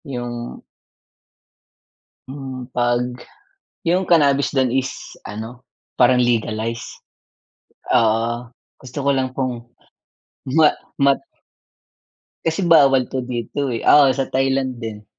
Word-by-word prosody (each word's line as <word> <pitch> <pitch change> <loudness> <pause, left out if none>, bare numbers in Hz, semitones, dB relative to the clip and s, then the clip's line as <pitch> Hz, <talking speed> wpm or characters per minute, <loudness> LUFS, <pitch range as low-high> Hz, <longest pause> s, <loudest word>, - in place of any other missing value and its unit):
Yung 120 -2 -6 1.7
Mm, 130 -2 -7
'pag 120 -1 +1 0.8
yung 180 +3 +2
cannabis 145 -5 +3
dun 130 -2 +2
is 130 0 0 0.3
ano, 115 +4 -8 0.3
parang 125 0 +5
legalize? 115 -1 -1 1.1
Oo, 115 +1 +1 0.3
gusto 130 +1 -12
ko 140 - +2
lang 130 -1 0
pong 125 -3 -3 0.9
ma 155 -2 +6 0.3
mat 140 0 +3 1.2
Kasi 165 +3 0
bawal 140 -6 +5
po 130 - -4
dito, 125 +3 -3
eh. 115 -2 -4
Oo, 145 -2 +7
sa 135 - 0
Thailand 130 -2 -1
din. 105 -2 -7
130 Hz, 105 wpm, -20 LUFS, 120-135 Hz, 1.7 s, Oo